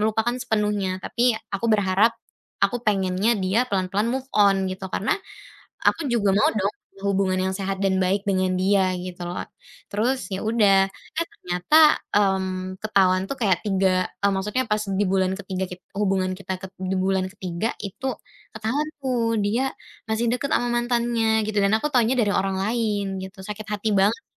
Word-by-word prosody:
melupakan 220 Hz, +2 st, +1 dB
sepenuhnya, 210 Hz, -5 st, 0 dB
tapi 240 Hz, -1 st, +2 dB, 0.2 s
aku 200 Hz, +4 st, -1 dB
berharap 210 Hz, +2 st, +3 dB, 0.5 s
aku 245 Hz, -1 st, 0 dB
pengennya 200 Hz, +1 st, +1 dB
dia 200 Hz, +6 st, +1 dB
pelan-pelan 195 Hz, +3 st, 0 dB
move 265 Hz, +2 st, -3 dB
on." 195 Hz, -2 st, +4 dB
Gitu. 185 Hz, +1 st, -6 dB
Karena 195 Hz, -, 0 dB, 0.7 s
aku 325 Hz, -, +2 dB
juga 205 Hz, -4 st, +2 dB
mau 210 Hz, -, +4 dB
dong 200 Hz, -1 st, +1 dB, 0.3 s
hubungan 195 Hz, -1 st, +1 dB
yang 190 Hz, -, -4 dB
sehat 195 Hz, 0 st, -3 dB
dan 190 Hz, -1 st, +2 dB
baik 190 Hz, +2 st, +1 dB
dengan 185 Hz, -2 st, +1 dB
dia 190 Hz, 0 st, +2 dB
gitu 180 Hz, 0 st, -7 dB
lho. 175 Hz, -, -4 dB, 0.5 s
Terus 240 Hz, +6 st, +1 dB
ya 190 Hz, -, -1 dB
udah, 200 Hz, -4 st, +4 dB
eh, 330 Hz, +10 st, -5 dB
ternyata, 180 Hz, -, +4 dB, 0.2 s
mmm, 190 Hz, -2 st, 0 dB
ketahuan 190 Hz, -3 st, +3 dB
itu -, -, -2 dB
kayak 195 Hz, -6 st, +2 dB
3 190 Hz, -2 st, +2 dB, 0.2 s
m 200 Hz, -, +4 dB
maksudnya 210 Hz, +7 st, -1 dB
pas 210 Hz, -, +3 dB
di 195 Hz, +1 st, 0 dB
bulan 190 Hz, 0 st, +1 dB
ke-3 190 Hz, -1 st, -3 dB
kit 180 Hz, 0 st, -8 dB, 0.2 s
hubungan 190 Hz, -2 st, +1 dB
kita 190 Hz, -1 st, -4 dB
ket 190 Hz, -, -7 dB
di 190 Hz, 0 st, -1 dB
bulan 190 Hz, 0 st, +1 dB
ke-3 185 Hz, +1 st, -3 dB
itu 200 Hz, +6 st, -6 dB, 0.5 s
ketahuan 240 Hz, +8 st, -1 dB, 0.2 s
tuh, 235 Hz, -3 st, 0 dB
dia 230 Hz, +6 st, +1 dB, 0.5 s
masih 220 Hz, +2 st, 0 dB
dekat 265 Hz, +3 st, -2 dB
ama 245 Hz, -, -1 dB
mantannya 235 Hz, -2 st, +1 dB
gitu. 215 Hz, -1 st, -1 dB
Dan 200 Hz, -, +2 dB
aku 260 Hz, -, -2 dB
tahunya 245 Hz, 0 st, +3 dB
dari 205 Hz, -2 st, +2 dB
orang 195 Hz, 0 st, 0 dB
lain 215 Hz, -2 st, 0 dB, 0.2 s
gitu. 190 Hz, +1 st, -9 dB
Sakit 210 Hz, 0 st, -6 dB
hati 210 Hz, +1 st, -1 dB
banget 210 Hz, +6 st, +2 dB
200 Hz, 165 wpm, -24 LUFS, 190-225 Hz, 0.7 s, on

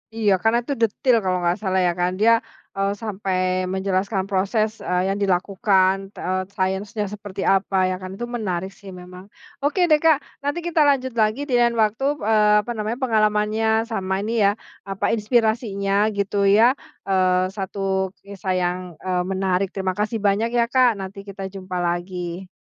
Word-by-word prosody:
Iya, 215 Hz, -3 st, +2 dB
karena 225 Hz, +1 st, +3 dB
itu 280 Hz, -, -2 dB
detil 230 Hz, +3 st, +2 dB
kalau 185 Hz, -1 st, +1 dB
nggak 175 Hz, +2 st, +1 dB
salah 190 Hz, -2 st, 0 dB
ya 175 Hz, -, +1 dB
kan, 180 Hz, +1 st, +1 dB
dia, 230 Hz, +2 st, +5 dB, 0.4 s
eee, 195 Hz, 0 st, +1 dB
sampai 195 Hz, -3 st, -2 dB, 0.4 s
menjelaskan 190 Hz, +1 st, -1 dB
proses, 205 Hz, +3 st, +1 dB
eee, 180 Hz, 0 st, 0 dB
yang 195 Hz, +1 st, -1 dB
dilakukan, 190 Hz, 0 st, +2 dB, 0.3 s
eee, 185 Hz, +1 st, 0 dB
sainsnya 200 Hz, +2 st, -1 dB
seperti 200 Hz, -2 st, -7 dB
apa 195 Hz, 0 st, 0 dB
ya 185 Hz, -, -1 dB
kan, 185 Hz, -, -6 dB
itu 240 Hz, -, -3 dB
menarik 195 Hz, -6 st, -3 dB
sih 200 Hz, -1 st, -11 dB
memang. 180 Hz, +1 st, -11 dB, 0.4 s
Oke 300 Hz, +6 st, 0 dB
deh 305 Hz, -1 st, +5 dB
Kak, 320 Hz, -3 st, +6 dB, 0.2 s
nanti 285 Hz, +4 st, -2 dB
kita 330 Hz, -2 st, +2 dB
lanjut 260 Hz, -3 st, 0 dB
lagi 215 Hz, +6 st, +1 dB
dengan 240 Hz, -3 st, +3 dB
waktu, 215 Hz, +5 st, 0 dB, 0.2 s
eee, 210 Hz, -1 st, +4 dB
apa 240 Hz, -, -4 dB
namanya, 215 Hz, +3 st, -2 dB
pengalamannya 215 Hz, -1 st, +1 dB, 0.2 s
sama 190 Hz, -3 st, -2 dB
ini 225 Hz, -, -2 dB
ya 200 Hz, -, +5 dB, 0.4 s
apa, 195 Hz, -, -2 dB
inspirasinya 215 Hz, -3 st, 0 dB, 0.2 s
gitu 200 Hz, 0 st, -1 dB, 0.2 s
ya, 225 Hz, -, +6 dB, 0.4 s
eee, 185 Hz, 0 st, +2 dB
1 195 Hz, +1 st, -5 dB, 0.5 s
kisah 195 Hz, -1 st, -4 dB
yang, 180 Hz, 0 st, 0 dB, 0.3 s
eee, 180 Hz, -1 st, 0 dB
menarik 190 Hz, 0 st, 0 dB
terima 190 Hz, -2 st, -2 dB
kasih 215 Hz, +2 st, 0 dB
banyak 215 Hz, +4 st, +1 dB
ya 235 Hz, -, +4 dB
Kak 255 Hz, -1 st, +6 dB
nanti 195 Hz, +1 st, -7 dB
kita 195 Hz, 0 st, -6 dB
jumpa 185 Hz, -1 st, -6 dB
lagi. 175 Hz, +1 st, -4 dB
200 Hz, 165 wpm, -22 LUFS, 185-225 Hz, 0.5 s, Kak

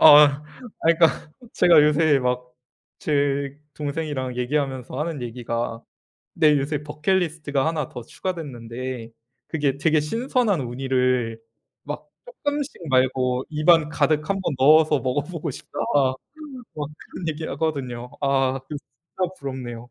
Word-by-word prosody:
아 150 Hz, -1 st, +8 dB, 0.4 s
아 -, -, +4 dB
그러니까 160 Hz, -2 st, +3 dB, 0.2 s
제가 170 Hz, -4 st, +6 dB
요새 150 Hz, -1 st, +4 dB
막 125 Hz, -1 st, -2 dB, 0.5 s
제 140 Hz, -1 st, 0 dB, 0.2 s
동생이랑 145 Hz, -4 st, -3 dB
얘기하면서 130 Hz, -1 st, -2 dB
하는 155 Hz, -3 st, -2 dB
얘기가 115 Hz, -1 st, -3 dB, 0.5 s
"내 155 Hz, -3 st, +5 dB
요새 145 Hz, +1 st, -2 dB
버킷리스트가 150 Hz, -2 st, 0 dB
하나 160 Hz, -4 st, -1 dB
더 120 Hz, -, -8 dB
추가됐는데 125 Hz, -6 st, -5 dB, 0.4 s
그게 145 Hz, -4 st, 0 dB
되게 155 Hz, +1 st, +3 dB
신선한 225 Hz, -, +1 dB
우니를 125 Hz, -2 st, 0 dB, 0.4 s
막 -, -, -6 dB, 0.2 s
쪼끔씩 295 Hz, -, -3 dB, 0.2 s
말고 130 Hz, -1 st, +2 dB
입안 155 Hz, 0 st, +4 dB
가득 155 Hz, 0 st, +2 dB
1 195 Hz, 0 st, 0 dB
번 170 Hz, -5 st, -1 dB
넣어서 150 Hz, +2 st, +6 dB
먹어보고 145 Hz, +6 st, -2 dB
싶다." -, -, -9 dB, 1.0 s
막 150 Hz, -2 st, -4 dB
그런 170 Hz, -, -7 dB
얘기하거든요. 145 Hz, -6 st, -3 dB
아 135 Hz, -1 st, +2 dB
그 150 Hz, -, -7 dB
진짜 170 Hz, +7 st, -6 dB
부럽네요. 125 Hz, -3 st, -6 dB
145 Hz, 270 characters per minute, -24 LUFS, 130-160 Hz, 1.0 s, 아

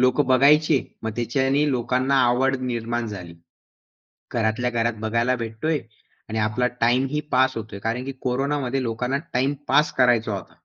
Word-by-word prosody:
लोक 130 Hz, +3 st, +3 dB
बघायचे. 145 Hz, +3 st, +5 dB, 0.3 s
मग 110 Hz, -, -1 dB
त्याच्याने 135 Hz, +5 st, +1 dB
लोकांना 130 Hz, +2 st, 0 dB
आवड 130 Hz, +2 st, +2 dB
निर्माण 120 Hz, -1 st, -2 dB
झाली. 90 Hz, -5 st, -8 dB, 1.0 s
घरातल्या 120 Hz, +1 st, 0 dB
घरात 120 Hz, 0 st, 0 dB
बघायला 115 Hz, +3 st, +1 dB
भेटतोय 120 Hz, +7 st, -2 dB, 0.5 s
आणि 110 Hz, -, -3 dB
आपला 110 Hz, +3 st, +1 dB
टाईम 125 Hz, +3 st, +3 dB
ही 150 Hz, +1 st, -1 dB
पास 130 Hz, 0 st, +3 dB
होतोय 110 Hz, -3 st, -6 dB
कारण 115 Hz, +4 st, -2 dB
की 135 Hz, -, -4 dB
कोरोनामध्ये 135 Hz, 0 st, -1 dB
लोकांना 125 Hz, +3 st, -1 dB
टाईम 135 Hz, +3 st, +1 dB
पास 150 Hz, 0 st, +3 dB
करायचा 120 Hz, -4 st, +3 dB
होता. 95 Hz, -, -10 dB
125 Hz, 145 wpm, -23 LUFS, 115-135 Hz, 1.0 s, बघायचे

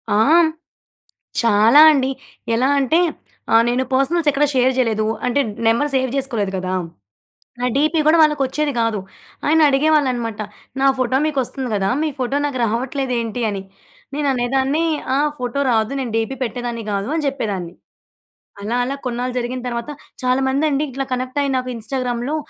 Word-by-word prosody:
ఆ! -, -, +3 dB, 0.2 s
హ్మ్ 320 Hz, -, +3 dB, 0.9 s
చాలా 230 Hz, +4 st, +5 dB
అండి. 270 Hz, -3 st, +1 dB, 0.5 s
ఎలా 255 Hz, +3 st, +2 dB
అంటే 295 Hz, +6 st, +2 dB, 0.5 s
ఆహ్ 230 Hz, -, +6 dB
నేను 250 Hz, +2 st, +1 dB
పర్సనల్స్ 310 Hz, +5 st, +1 dB
ఎక్కడ 285 Hz, +2 st, +2 dB
షేర్ 255 Hz, 0 st, +3 dB
చేయలేదు. 220 Hz, -4 st, +1 dB, 0.2 s
అంటే 245 Hz, +3 st, +1 dB, 0.3 s
నెంబర్ 235 Hz, +6 st, +2 dB
సేవ్ 260 Hz, 0 st, +1 dB
చేసుకోలేదు 230 Hz, -8 st, -2 dB
కదా! 185 Hz, 0 st, -3 dB, 0.9 s
నా -, -, -1 dB
డీపీ 310 Hz, +3 st, +2 dB
కూడా 325 Hz, +2 st, +5 dB
వాళ్ళకి 300 Hz, -2 st, +3 dB
వచ్చేది 290 Hz, +2 st, -1 dB
కాదు. 225 Hz, -3 st, 0 dB, 0.5 s
ఆయన 315 Hz, +2 st, +4 dB
అడిగేవాళ్ళు 295 Hz, +1 st, +3 dB
అనమాట. 230 Hz, -3 st, -4 dB, 0.4 s
నా 275 Hz, -, +3 dB
ఫోటో 255 Hz, +1 st, +1 dB
మీకు 300 Hz, -3 st, -2 dB
వస్తుంది 260 Hz, +1 st, -5 dB
కదా! 195 Hz, -1 st, 0 dB
మీ 315 Hz, -, +1 dB
ఫోటో 260 Hz, +2 st, -1 dB
నాకు 280 Hz, -3 st, -3 dB
రావట్లేదేంటి 245 Hz, 0 st, -2 dB
అని. 195 Hz, -1 st, -4 dB, 0.5 s
నేను 290 Hz, -1 st, 0 dB
అనేదాన్ని, 265 Hz, +5 st, 0 dB, 0.3 s
ఆ! -, -, +2 dB, 0.2 s
ఫోటో 250 Hz, +2 st, -2 dB
రాదు 220 Hz, +1 st, +1 dB
నేను 245 Hz, -4 st, -4 dB
డీపీ 225 Hz, +4 st, -1 dB
పెట్టేదాన్ని 240 Hz, -1 st, -4 dB
కాదు 200 Hz, +6 st, -2 dB
అని 305 Hz, -, -1 dB
చెప్పేదాన్ని. 195 Hz, -10 st, -4 dB, 0.9 s
అలా, 225 Hz, +4 st, -2 dB
అలా 275 Hz, -, -3 dB
కొన్నాళ్ళు 250 Hz, +1 st, -3 dB
జరిగిన 245 Hz, +1 st, -4 dB
తర్వాత 235 Hz, +2 st, -4 dB, 0.3 s
చాలామందండి 270 Hz, +3 st, +1 dB
ఇట్లా 270 Hz, +1 st, -3 dB
కనెక్ట్ 255 Hz, +2 st, -2 dB
అయ్యి 275 Hz, -1 st, -1 dB
నాకు 255 Hz, 0 st, -3 dB
ఇన్‌స్టాగ్రామ్‌లో 245 Hz, +4 st, -3 dB
255 Hz, 155 wpm, -20 LUFS, 230-275 Hz, 0.9 s, ఆహ్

